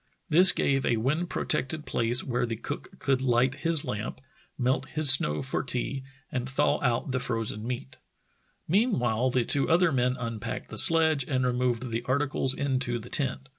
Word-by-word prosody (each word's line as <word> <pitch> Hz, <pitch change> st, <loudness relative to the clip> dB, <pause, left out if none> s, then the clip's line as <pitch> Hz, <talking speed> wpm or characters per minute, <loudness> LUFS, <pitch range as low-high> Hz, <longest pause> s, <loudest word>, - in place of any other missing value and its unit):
This 175 Hz, +4 st, +8 dB
gave 135 Hz, -1 st, 0 dB
a 120 Hz, -, +1 dB
wind 150 Hz, +10 st, -1 dB
protected 150 Hz, +1 st, -2 dB
place 120 Hz, +2 st, +1 dB
where 125 Hz, -1 st, -2 dB
the 115 Hz, -, -3 dB
cook -, -, -8 dB
could 135 Hz, -1 st, 0 dB
light 125 Hz, 0 st, +1 dB
his 160 Hz, +1 st, 0 dB
lamp, 105 Hz, +4 st, -5 dB, 0.4 s
melt 130 Hz, +1 st, -1 dB
his 155 Hz, -3 st, +5 dB
snow 75 Hz, -, +3 dB
for -, -, -2 dB
tea, 135 Hz, +2 st, -3 dB, 0.3 s
and 125 Hz, 0 st, -3 dB
thaw 145 Hz, +2 st, 0 dB
out 125 Hz, 0 st, -1 dB
the 130 Hz, -, -1 dB
frozen 115 Hz, -3 st, -2 dB
meat. 120 Hz, -, -6 dB, 0.7 s
Meanwhile 130 Hz, -, +1 dB
the 125 Hz, -2 st, 0 dB
two 140 Hz, -, +1 dB
other 170 Hz, +1 st, +3 dB
men 125 Hz, -1 st, 0 dB
unpacked 115 Hz, -3 st, -6 dB
the -, -, -1 dB
sledge 160 Hz, -4 st, +4 dB
and 130 Hz, -1 st, -1 dB
removed 125 Hz, -1 st, -1 dB
the 115 Hz, +1 st, -2 dB
articles 135 Hz, 0 st, -1 dB
into 130 Hz, -3 st, -2 dB
the 120 Hz, +1 st, -10 dB
tent. 135 Hz, -1 st, -2 dB
130 Hz, 170 wpm, -27 LUFS, 120-140 Hz, 0.7 s, This